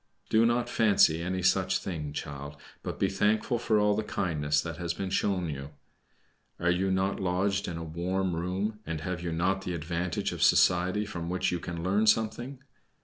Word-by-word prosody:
Do 115 +1 +5
not 120 +1 +1
fancy 100 -9 +4
any 90 +1 -2
such 95 +1 +3
thing, 75 -6 -5
child; 70 -1 -6 0.3
but - - -5
be - - +3
thankful 105 +4 +1
for 110 -2 +2
all 105 0 +3
the 110 - 0
kindness 75 -8 0
that 85 0 -6
has 85 -1 -3
been 95 -1 -4
shown 95 -3 0
you. 70 0 -6 0.8
Are 90 +1 +2
you 95 +2 +1
not 95 +1 0
lodged 95 +2 0
in 85 - -4
a 85 - -5
warm 90 +3 -2
room, 95 +5 -2
and 80 -4 -4
have 90 +1 -3
you 85 -1 -3
not 95 +4 0
the 90 -2 -3
advantage 85 +2 -2
of - - -6
society 90 +4 +4
from 85 -5 -5
which 90 +1 0
you 90 - -1
can 85 -1 -5
learn 100 +4 +2
something? 120 +5 +1
90 Hz, 190 wpm, -29 LUFS, 85-100 Hz, 0.8 s, Do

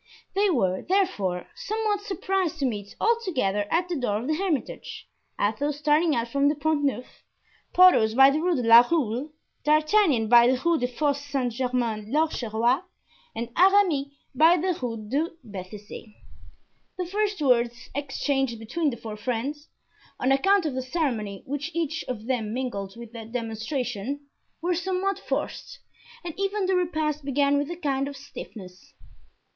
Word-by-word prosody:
They 405 +1 +2
were, 190 - +1
therefore, 210 - 0
somewhat 430 -1 -2
surprised 380 -3 -1
to 280 - -1
meet 205 -5 -4
altogether 290 - +1
at 350 +2 +1
the 355 - -2
door 245 -8 0
of 225 - -5
the 310 - 0
Hermitage, 330 -3 -3 0.3
Athos 280 +8 0
starting 300 +1 +2
out 235 0 -1
from 280 +4 +2
the 300 - 0
Pont 300 0 0
Neuf, 265 -3 -3 0.5
Porthos 290 -13 +6
by 270 +1 +8
the 300 - 0
Rue 350 +1 +1
de 250 - -1
la 230 +1 +10
Roule, 280 -2 0 0.3
D'Artagnan 305 - +3
by 235 +1 +7
the 255 0 +2
Rue 335 -2 +3
des 245 - 0
Fosse 285 +3 -1
Saint 270 -4 -2
Germain 235 -4 -2
l'Auxerrois, 250 -4 +1 0.5
and 230 +1 -4
Aramis 370 -7 +4 0.3
by 320 +6 +5
the 360 +1 0
Rue 230 -4 -4
de 295 +8 0
Bethisy. 210 +1 -9 0.8
The 365 - -2
first 410 +2 -1
words 245 -3 +1
exchanged 270 -3 -1
between 275 +9 -1
the 240 - -5
four 220 -1 -7
friends, 255 +7 -4 0.5
on 260 - +1
account 385 +7 +3
of 300 - -1
the 260 - -2
ceremony 250 - -2
which 290 +3 -3
each 325 -1 -1
of 225 -4 -5
them 230 -3 -2
mingled 200 -7 -4
with 235 -1 -10
their 225 -2 -7
demonstration, 240 +2 -3 0.4
were 355 +1 +1
somewhat 380 +2 -1
forced - - -4 0.5
and 340 - -4
even 395 0 0
the 375 0 +1
repast 310 -4 -1
began 280 +1 +2
with 290 +1 -2
a 345 - -4
kind 275 -5 -1
of 285 -1 -7
stiffness. 195 -9 -11
275 Hz, 160 wpm, -26 LUFS, 235-335 Hz, 0.8 s, la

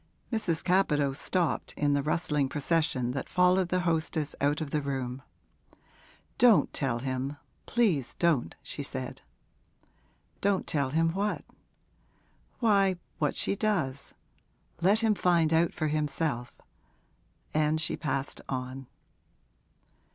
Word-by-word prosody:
Mrs. 175 -8 +1
Capadose 150 -7 +2
stopped, 180 -4 -1
in 145 -1 +2
the 140 - +2
rustling 150 -2 0
procession 145 -4 0
that 135 +1 -4
followed 180 0 +3
the 180 0 +1
hostess 160 -3 -1
out 145 +2 +2
of 155 -3 -4
the 150 - 0
room. 135 -2 -3 1.2
'Don't 225 - +5
tell 135 -5 0
him, 130 +3 -3 0.3
please 190 - +1
don't,' 155 - +1
she - - -6
said. - - -4 1.2
'Don't 200 -1 +1
tell 140 -3 0
him 165 +4 +2
what?' 200 +4 -2 1.2
'Why, 200 -4 +4 0.2
what 150 -2 +1
she - - 0
does. 175 -11 -1 0.7
Let 200 +6 +4
him 220 -1 +3
find 170 -5 +2
out 165 +1 +3
for 155 - -2
himself.' 150 -4 -1 1.0
And 155 +1 +2
she 160 - 0
passed 140 -2 -3
on. 130 0 -4
155 Hz, 120 wpm, -29 LUFS, 140-180 Hz, 1.2 s, Don't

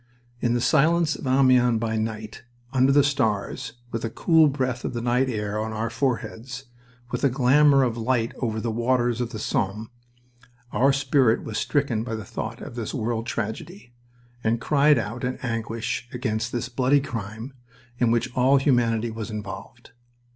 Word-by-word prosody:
In 120 0 +1
the 120 - 0
silence 155 +3 +3
of 135 - -7
Amiens 130 -3 +4
by 110 -1 -1
night, 110 -1 -4 0.3
under 130 +1 +4
the 145 +1 +5
stars, 120 -8 -1 0.2
with 115 - -3
a 115 - -1
cool 160 +5 +4
breath 130 -3 -2
of - - -3
the 120 - -2
night 125 +2 +1
air 105 -2 -2
on 110 0 -4
our 115 +1 -2
foreheads, 125 +1 -3 0.5
with - - -3
a 140 - +5
glamour 135 +2 +4
of 120 -2 -1
light 115 0 0
over 110 -3 -1
the 115 +1 -2
waters 120 +1 +1
of 120 - -2
the 115 - -7
Somme, 105 +3 -2 0.8
our 130 +6 +3
spirit 135 -3 +2
was 110 0 -3
stricken 135 -7 0
by 115 -1 -4
the 110 -1 -6
thought - - -6
of - - -8
this 120 +1 -4
world 115 -1 -2
tragedy, 120 - -5 0.5
and 115 +1 +1
cried 150 +2 +4
out 115 +3 -4
in 125 +1 -2
anguish 115 0 -3
against 115 -2 -2
this 120 -1 -2
bloody 130 +3 +2
crime 115 -1 -6 0.5
in 120 - +3
which 120 +2 0
all 130 +2 +4
humanity 120 -4 +2
was 110 0 -6
involved. 105 +3 -8
120 Hz, 170 wpm, -24 LUFS, 110-135 Hz, 0.8 s, the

